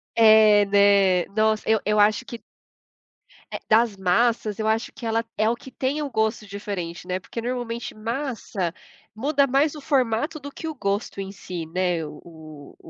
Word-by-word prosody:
É, 215 -2 +6
né. 200 -3 +4
Nossa, 215 0 +1
eu 220 0 +3
eu 210 +1 +2
acho 210 +4 +3
que 235 -3 -9 1.1
eh, - - -4
das 220 -2 +3
massas, 210 +3 +1
eu 220 - -1
acho 220 +1 0
que 235 - -9
ela 225 0 0
é 215 +1 +2
o 235 - 0
que 260 +2 -13
tem 270 +4 -2
o 290 - -3
gosto 220 -2 -1
diferente, 195 -4 -6
né. 185 0 -2
Porque 230 +5 -7
normalmente 240 -1 -4
massa 225 - -3 0.4
muda 280 +5 +2
mais 280 +4 +2
o 300 - -9
formato 275 +2 0
do 285 0 -9
que 320 - -7
o 315 - -3
gosto 200 -3 -3
em 195 0 -6
si, 180 -4 -7
né? 175 0 -1
O 150 0 -10 0.2
o 150 -2 -12
220 Hz, 175 wpm, -24 LUFS, 200-245 Hz, 1.1 s, É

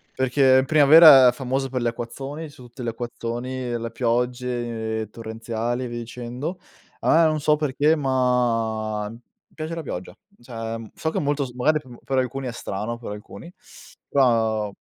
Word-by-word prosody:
Perché 130 0 +4
in 130 - -4
primavera 150 -3 +8
è - - +2
famosa 135 +1 -2
per 125 -1 -2
gli 120 - 0
acquazzoni, 135 +7 -5
son 130 -3 -14
tutti 125 +2 -12
gli 120 - -4
acquazzoni, 120 +1 -4
le 115 0 -5
piogge 120 -2 -2
torrenziali 115 +2 -4
e - - -4
via 120 0 -5
dicendo. 125 +9 -6 0.4
Ah, 165 +1 +4
non 155 -1 0
so 150 +1 +3
perché, 150 +1 +2
ma 115 -6 0
mi 115 +2 -13 0.3
piace 160 +1 -5
la 165 - -5
pioggia. 90 -9 -6 0.3
Cioè, 115 -2 -5 0.2
so 160 - -2
che - - -1
è - - -2
molto 145 -1 0
s 125 - -9
magari 150 +5 +2
pe 120 - -11
per 135 -1 -2
alcuni 130 +1 -3
è 120 - -3
strano, 110 0 -5
per 120 -3 -8
alcuni, 105 +11 -10 0.6
però 110 -6 +2
125 Hz, 170 wpm, -23 LUFS, 115-135 Hz, 0.6 s, primavera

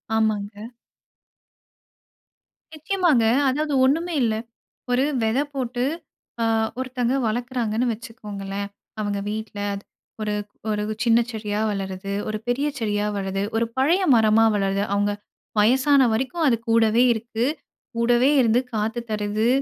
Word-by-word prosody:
ஆமாங்க. 210 -1 -1 2.1
நிச்சயமாங்க. 310 -6 +2 0.3
அதாவது 295 +2 -1
ஒண்ணுமே 330 +6 +1
இல்ல. 220 -2 +1 0.6
ஒரு 250 +2 +3 0.2
வெத 220 +3 +1 0.2
போட்டு 250 -2 -2 0.6
அ - - +3 0.3
ஒருத்தவங்க 255 0 -1
வளர்க்குறாங்கன்னு 240 0 -1
வச்சுக்கோங்களேன். 205 -4 -6 0.3
அவங்க 205 -1 -1
வீட்ல. 215 -1 -5 0.2
அது 200 - -7 0.4
ஒரு 210 -1 -1 0.4
ஒரு 210 0 0 0.2
சின்ன 235 0 +5
செடியா 215 -2 -3
வளருது, 195 0 -4 0.2
ஒரு 215 0 -2
பெரிய 270 +4 +1
செடியா 210 -2 0
வளருது 195 0 -2
ஒரு 230 - +2
பழைய 320 +9 +3
மரமா 220 0 +5
வளருது. 195 0 0
அவங்க 205 0 +1 0.5
வயசான 265 +6 +5
வரைக்கும் 265 +8 -1
அது 235 - +3
கூடவே 225 +1 +4
இருக்கு. 230 +1 -2 0.5
கூடவே 240 +3 +3
இருந்து 235 0 +3
காத்து 220 +2 -1
தருது, 210 +2 0
225 Hz, 115 wpm, -23 LUFS, 210-250 Hz, 2.1 s, சின்ன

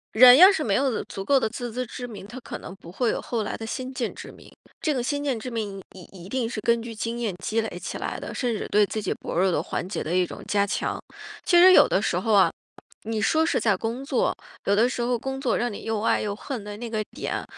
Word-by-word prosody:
人 250 +3 +10
要 370 +4 +10
是 320 -6 -1
没 200 -3 +1
有 265 -4 0
足 195 - -6
够 275 +5 +4
的 220 - 0
自 240 0 -5
知 250 +2 -3
之 245 +2 -7
明， 210 -4 -9
他 240 +4 -8
可 - - -7
能 - - -9
不 170 -3 -13
会 230 +5 0
有 - - -1
后 230 -3 -2
来 - - -4
的 225 - -6
先 255 +3 -5
见 240 -3 -3
之 - - -10
明。 - - -16 0.3
这 310 -6 0
个 250 - -1
先 285 +3 -1
见 265 -5 0
之 250 +3 -6
明 205 -4 -4
你 185 - -12
一 185 -1 -11
定 245 -2 -1
是 215 -3 -4
根 235 +1 +2
据 230 -1 -7
经 230 +2 -3
验 215 -6 -2
积 225 +1 0
累 220 -5 -5
起 180 - -5
来 - - -4
的， - - -7
甚 245 -2 -1
至 - - -4
对 210 0 +4
自 215 - -4
己 200 - -1
薄 - - -7
弱 190 +1 +3
的 - - +1
环 180 - -4
节 195 - -3
的 165 - -3
一 180 0 +3
种 - - -9
加 200 -1 +2
强。 200 - -2 0.4
其 350 -1 +5
实 370 +1 +9
有 - - +8
的 - - +1
时 - - 0
候 220 -2 0
啊， 195 -2 +5 0.5
你 220 -1 -2
说 320 +9 +3
是 - - +1
在 215 -4 +2
工 230 +6 -4
作， 275 - 0 0.3
有 200 - +3
的 230 +4 +4
时 250 - -3
候 240 +1 +1
工 265 +3 -4
作 270 - 0
让 240 -1 -1
你 - - -8
又 225 -2 -2
爱 225 - +2
又 205 -1 -2
恨 245 -1 -6
的 205 0 -7
那 235 +1 -6
个 215 -1 -1
点， - - -4
230 Hz, 300 characters per minute, -25 LUFS, 205-255 Hz, 0.5 s, 人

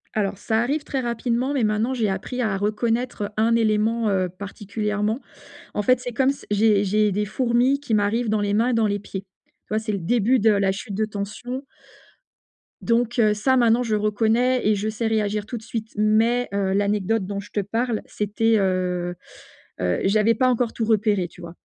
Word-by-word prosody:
Alors 200 -2 -1
ça 220 +1 0
arrive 285 +4 -1
très 265 -2 -2
rapidement, 240 +3 -1
mais 260 -5 +1
maintenant 215 +4 +1
j'ai 225 -5 0
appris 250 +6 -3
à 205 -4 0
reconnaître 215 +1 -1
un 230 +1 +3
élément, 220 0 +1
heu, 185 -2 +1
particulièrement. 210 +4 -3 0.5
En - - -2
fait, 255 +4 +3
c'est 245 -1 -5
comme 260 +2 +2
s 275 - -2
j'ai 205 -1 +3
j'ai 210 +1 +2
des 210 +2 0
fourmis 245 +5 +1
qui 240 -6 -2
m'arrivent 215 +3 +1
dans 215 -1 +1
les 205 0 0
mains 230 +4 +2
et - - +1
dans 225 -1 +2
les 205 0 0
pieds, 195 -1 -7 0.4
tu - - -50
vois? 215 - +1
C'est 220 -1 -3
le 200 - -1
début 235 +7 +2
de 220 +1 +4
la 200 -2 +2
chute 200 +1 -6
de 215 +1 0
tension. 220 +6 -5 1.2
Donc 240 +1 +1
heu, 215 -2 +4
ça 260 +5 +2
maintenant 235 0 +4
je 220 -2 0
reconnais 225 +4 +1
et 215 - +4
je 205 +2 -2
sais 220 +1 -2
réagir 210 -1 0
tout 240 +2 -5
de - - -9
suite, 220 -1 -5
mais 225 +3 +2
heu, 195 -1 0
l'anecdote 205 +1 +1
dont 200 0 -4
je 205 - -15
te 210 - -1
parle, 225 +3 -1
c'était, 220 +2 0
heu 180 -2 0 0.7
heu, 90 -1 +1
j'avais 215 +3 +3
pas 255 -1 +2
encore 245 -1 +1
tout 225 - -2
repéré, 210 -4 +2
tu 175 - -16
vois? 170 0 -9
215 Hz, 200 wpm, -23 LUFS, 205-235 Hz, 1.2 s, de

